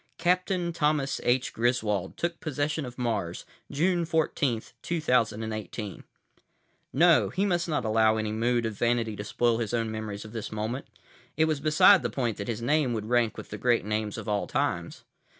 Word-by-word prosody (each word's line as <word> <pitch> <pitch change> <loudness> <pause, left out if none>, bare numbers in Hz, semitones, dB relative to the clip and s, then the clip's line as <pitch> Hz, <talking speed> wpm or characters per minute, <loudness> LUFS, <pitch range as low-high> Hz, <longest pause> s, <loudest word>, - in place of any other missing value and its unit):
"Captain 180 0 +1
Thomas 150 -3 0
H. 125 +1 +1
Griswold 110 -5 0
took 170 0 -2
possession 150 -1 -2
of 125 - -10
Mars, 105 -9 -2 0.3
June 175 +4 +1
14, 155 -7 0 0.2
2018." 110 - -1 0.9
No, 165 +3 +5
he 195 +1 0
must 175 -3 0
not 150 -6 -1
allow 110 0 +3
any 110 -1 -2
mood 120 +2 +1
of 110 - -2
vanity 115 0 0
to 105 - -5
spoil 115 +3 +1
his 115 0 -1
own 115 -1 -1
memories 110 -1 -5
of 110 - -10
this 110 -3 -5
moment. 110 +5 -3 0.5
It 160 - +4
was 155 -2 0
beside 155 +5 +6
the 120 - -1
point 120 -1 -2
that 100 - -5
his 115 0 -3
name 140 -1 +2
would 110 -1 -4
rank 120 -2 +2
with - - -9
the 105 - -6
great 120 -3 +2
names 105 -1 -2
of - - -7
all 105 -1 0
times. - - -2
120 Hz, 175 wpm, -27 LUFS, 110-150 Hz, 0.9 s, beside